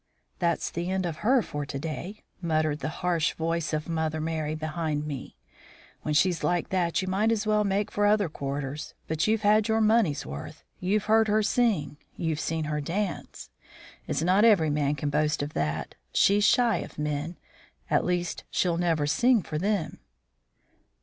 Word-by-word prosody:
"That's 170 -2 0
the 170 +2 -3
end 190 -1 0
of 165 -3 -3
her 245 +4 +3
for 145 0 -4
to 140 - -5
day," 165 +7 -6 0.2
muttered 155 -3 0
the 155 - -3 0.2
harsh 170 -3 +2
voice 165 0 -1
of 155 -1 -2
Mother 160 -1 -1
Merry 155 -1 -2
behind 155 -1 -2
me. 140 -4 -6 0.6
"When 150 - -2
she's 175 +3 +2
like 175 -1 0
that 185 +1 0
you - - -4
might 205 +4 +2
as 220 -1 0
well 210 0 +3
make 200 0 0
for 205 0 +2
other 205 -2 +3
quarters. 140 0 -5
But 160 +3 0
you've 220 0 +1
had 210 +1 +4
your 220 0 +2
money's 215 -8 +2
worth. 70 +2 -8 0.2
You've 200 +3 +1
heard 220 +1 +4
her 215 +1 +2
sing; 205 -11 +1 0.2
you've 160 -3 -2
seen 160 +1 -1
her 150 0 -2
dance. 185 +6 -4 0.6
It's - - -1
not 185 +4 +4
every 190 -10 +5
man 145 -1 +1
can 145 0 -2
boast 150 0 +1
of 145 - -5
that. 75 0 -2 0.2
She's 205 - +4
shy 240 -3 +4
of - - -7
men; 150 +3 -3 0.5
at - - +2
least 175 -1 -1
she'll 175 -2 +1
never 165 -4 +1
sing 220 - +3
for 155 - -4
them." 195 -4 -1
170 Hz, 175 wpm, -27 LUFS, 150-205 Hz, 0.6 s, every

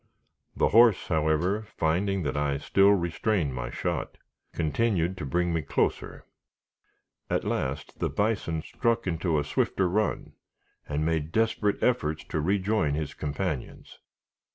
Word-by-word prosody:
The - - +3
horse, 115 -2 +5
however, 80 +5 +1 0.2
finding 95 +4 +1
that 75 - -2
I 75 -1 0
still 95 +7 +4
restrained 85 - +1
my - - -4
shot, - - -3 0.3
continued 90 +2 0
to 75 - -5
bring 85 +5 0
me 80 - 0
closer. 70 - -2 1.0
At - - 0
last, 65 +1 -3
the - - 0
bison 100 -7 -1
struck 115 -2 -1
into 85 -2 0
a 75 - +1
swifter 90 +5 0
run, 105 +4 -1 0.6
and 75 +1 -1
made 80 -1 -1
desperate 110 -1 +1
efforts 80 -11 +1
to 80 - -1
rejoin 95 -3 +1
his 75 -1 -3
companions. 75 -1 -4
85 Hz, 130 wpm, -27 LUFS, 75-100 Hz, 1.0 s, horse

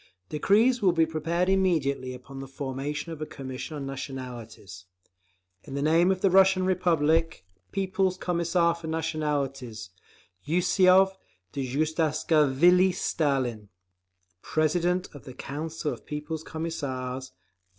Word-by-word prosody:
Decrees 220 - +3
will 185 -4 +4
be 165 -1 +3
prepared 165 +3 -1
immediately 155 -9 +1
upon 135 +2 -11
the 135 - -7
formation 140 +4 -4
of 160 -2 -8
a - - -2
Commission 135 +3 -7
on 140 - -5
Nationalities. 125 -9 -8 0.8
In 135 - -8
the 140 - -1
name 165 +4 +4
of 190 -1 0
the 195 - +3
Russian 190 0 +5
Republic, 165 - +1 0.3
People's 190 -1 0
Commissar 170 -1 +1
for 170 -1 -9
Nationalities 140 - -3 0.5
YUSSOV 185 +4 +4 0.4
DJUGASHVILI 155 +4 +2
STALIN 130 -9 -1 0.7
President 175 +4 0
of 145 - -12
the 130 - -10
Council 155 +2 -4
of - - -13
People's 150 +1 -5
Commissars 130 -6 -4
V. - - -36
155 Hz, 120 wpm, -27 LUFS, 135-175 Hz, 0.8 s, Russian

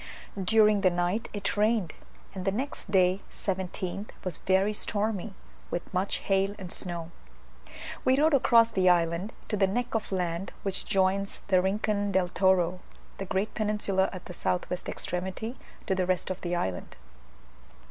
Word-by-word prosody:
During 210 +1 +5
the 190 - +5
night 175 +6 -1
it 205 -1 -2
rained, 210 -4 +2 0.4
and 190 -2 -5
the 195 - +1
next 255 +1 -4
day 185 0 +3
(17th) 190 +1 -3
was 185 -4 -3
very 190 +2 +2
stormy, 210 -1 -2 0.3
with 175 - -4
much 190 +2 0
hail 195 +1 +2
and 185 -3 -7
snow. 170 -2 -4 0.9
We 260 +1 +4
rode 310 +1 +4
across 230 -4 +5
the 185 -1 +3
island 170 +3 +2 0.2
to 215 - 0
the 195 -1 +3
neck 240 +5 -2
of 225 -2 -2
land 180 -1 -2
which 195 -1 -1
joins 195 0 +1
the 185 -2 +5
Rincon 205 +1 0
del 185 -2 +2
Toro 185 -1 +2 0.4
(the 195 - -3
great 195 +3 -1
peninsula 205 -3 +1
at 185 - -8
the 180 - -8
S. - - -16
W. 180 0 0
extremity) 190 +7 -3 0.3
to 190 - +1
the 185 -1 0
rest 185 0 0
of 185 - -5
the 175 0 -1
island. 95 - -3
190 Hz, 160 wpm, -28 LUFS, 180-210 Hz, 0.9 s, During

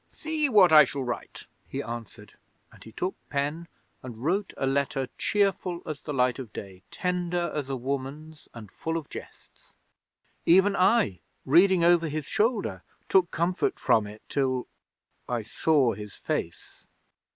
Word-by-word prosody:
'"See 310 -2 -2
what 195 -8 +6
I 155 -1 +10
shall 140 0 -3
write," 120 -3 -6 0.2
he - - -4
answered, 115 -1 -8 0.4
and - - -16
he 110 - -12
took 180 - -2 0.2
pen 150 +4 -2 0.3
and 120 -3 -8
wrote 190 +6 0
a - - -1
letter 135 -1 0
cheerful 195 -4 0
as 155 -3 -5
the 150 - -6
light 125 -2 +1
of 125 -5 -7
day, 95 -2 -9
tender 175 -1 -1
as 145 -3 -3
a 135 - -1
woman's 140 +4 -5
and 110 -4 -11
full 165 0 -3
of 160 - -7
jests. - - -12 0.7
Even 190 +3 +5
I, 180 - +3 0.3
reading 175 +5 +5
over 170 -1 +4
his 150 -1 -3
shoulder, 205 - 0 0.3
took 185 -2 +4
comfort 180 - 0
from 110 -2 +2
it 105 +1 -12
till 130 -2 0 0.6
I 120 -2 -1
saw 130 +2 +2
his 105 -2 -9
face! - - -5
150 Hz, 150 wpm, -27 LUFS, 125-180 Hz, 0.7 s, I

